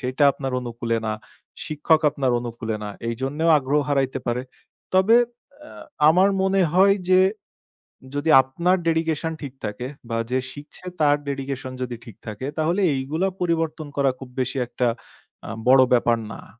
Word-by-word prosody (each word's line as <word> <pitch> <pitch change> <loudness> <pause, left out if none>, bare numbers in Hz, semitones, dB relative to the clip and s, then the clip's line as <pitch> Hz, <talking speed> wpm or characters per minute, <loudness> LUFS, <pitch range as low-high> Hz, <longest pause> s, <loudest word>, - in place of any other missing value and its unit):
সেইটা 130 +3 +1
আপনার 135 -2 -5
অনুকূলে 120 -1 -3
না। 110 - 0 0.5
শিক্ষক 155 +1 +2
আপনার 140 -3 -1
অনুকূলে 115 -2 -4
না। 105 - -4 0.2
এইজন্যেও 135 +8 -1
আগ্রহ 140 +2 +1
হারাইতে 135 -2 0
পারে। 120 +1 -1 0.5
তবে 190 +5 +5 0.5
অ্যা 305 - -12 0.3
আমার 185 +5 +5
মনে 190 0 +2
হয় 195 +2 +5
যে 185 0 +6 1.0
যদি 145 +3 -1
আপনার 170 +8 +1
dedication 160 -1 0
ঠিক 140 -3 -6
থাকে 105 +5 -4 0.2
বা 115 - -1
যে 130 - +2
শিখছে 145 +5 -11
তার 145 -1 +4
dedication 135 -1 -4
যদি 125 -1 -3
ঠিক 115 -5 -11
থাকে, 110 +4 -5
তাহলে 170 +5 +1
এইগুলা 150 +8 -1
পরিবর্তন 165 -3 -1
করা 140 -1 +3
খুব 130 - -9
বেশি 130 +1 -1
একটা 120 0 -1 0.6
আ - - -6 0.2
বড় 130 +1 +7
ব্যাপার 120 -1 +3
না। - - -9
140 Hz, 150 wpm, -23 LUFS, 125-160 Hz, 1.0 s, বড়